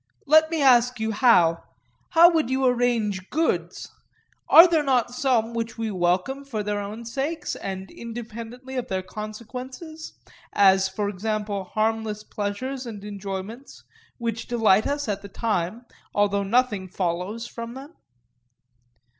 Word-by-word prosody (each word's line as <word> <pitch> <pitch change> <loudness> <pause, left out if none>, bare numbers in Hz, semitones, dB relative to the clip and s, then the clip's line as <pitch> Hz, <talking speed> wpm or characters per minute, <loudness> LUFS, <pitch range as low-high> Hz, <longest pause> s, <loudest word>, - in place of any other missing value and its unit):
Let 315 +2 +5
me 325 -3 0
ask 250 -2 +5
you 220 0 -1
now:—How 240 - +3
would 320 -6 +1
you 265 0 +1
arrange 235 -6 +1
goods—are 325 +1 +2
there 330 -3 +2
not 255 -4 +1
some 245 -3 +1
which 230 0 -4
we 225 -1 -2
welcome 185 +9 0
for 225 -7 -4
their 205 0 -2
own 210 +3 -6
sakes, 280 +7 -3
and 190 0 -6
independently 235 +2 -8
of 250 - -2
their 190 -1 -2
consequences, 250 - -8 0.4
as, 190 -1 +5
for 200 +2 -2
example, 205 0 -3
harmless 215 0 -1
pleasures 250 +7 -4
and 205 -3 -8
enjoyments, 200 +5 -7 0.3
which 230 -2 -4
delight 220 -4 +3
us 285 -1 -2
at 205 -2 -2
the 200 - -10
time, 215 +1 -2 0.3
although 205 0 +2
nothing 205 -2 +1
follows 185 +5 -3
from 230 0 -7
them? 280 +5 -10
225 Hz, 130 wpm, -24 LUFS, 205-255 Hz, 0.4 s, Let